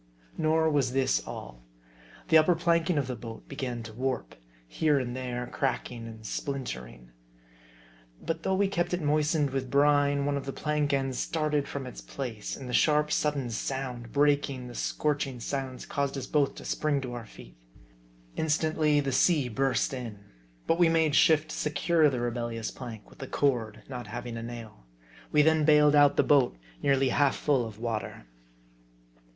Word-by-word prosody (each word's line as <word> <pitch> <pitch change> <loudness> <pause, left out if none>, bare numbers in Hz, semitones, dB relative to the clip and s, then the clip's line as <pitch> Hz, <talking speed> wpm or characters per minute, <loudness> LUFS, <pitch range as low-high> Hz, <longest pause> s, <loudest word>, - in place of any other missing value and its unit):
Nor 160 +1 +2
was 135 -4 +1
this 130 - +2
all. - - -8 0.7
The 160 - +7
upper 170 +3 +4
planking 170 0 +1
of 140 - +1
the 125 0 -4
boat 115 0 -9
be 140 - -9
gan 125 -4 -4
to 110 -1 -9
warp; 130 +1 -3 0.3
here 150 - +2
and 125 -2 -2
there, 125 -1 -3
cracking 120 -3 -3
and 110 -1 -11
splintering. 65 - -5 1.1
But 165 0 -3
though 190 +3 0
we 200 +1 +2
kept 175 -2 0
it 180 - -5
moistened 150 -1 +2
with 130 -1 -3
brine, 145 0 +3
one 145 0 0
of 140 - -6
the 135 - -3
plank 150 -1 -1
ends 135 -2 0
started 150 -3 0
from 140 -2 -5
its 125 - -8
place; 120 -6 -5
and 135 - -8
the 125 - -5
sharp, 150 +1 +3
sudden 140 -5 0
sound, 125 -1 -4
breaking 140 -3 +1
the 120 - -9
scorching 140 0 -1
silence, 130 +1 -4
caused 140 -1 -2
us 135 - -4
both 145 -2 +1
to - - -10
spring 150 -2 0
to 125 -2 -5
our 120 -3 -7
feet. - - -14 0.8
Instantly 155 -1 +2
the 135 -1 -2
sea 140 -1 +3
burst 130 +1 0
in; 120 -5 -5 0.5
but 165 - +1
we 175 -2 +6
made 160 -2 +2
shift 155 +1 +4
to - - -4
secure 155 +1 +2
the 130 -3 -2
rebellious 120 -2 -3
plank 115 -5 -9
with - - -16
a 135 - -5
cord, 120 -7 0
not 125 -2 -6
having 120 -1 -6
a 115 - -5
nail; 115 - -9 0.4
we 150 - +5
then 160 0 +4
bailed 150 -1 +6
out 145 -1 +6
the - - +5
boat, 135 - +3 0.2
nearly 135 -1 +3
half 140 +1 +3
full 140 -4 +1
of 105 -2 -10
water. 110 - -4
135 Hz, 175 wpm, -28 LUFS, 120-150 Hz, 1.1 s, The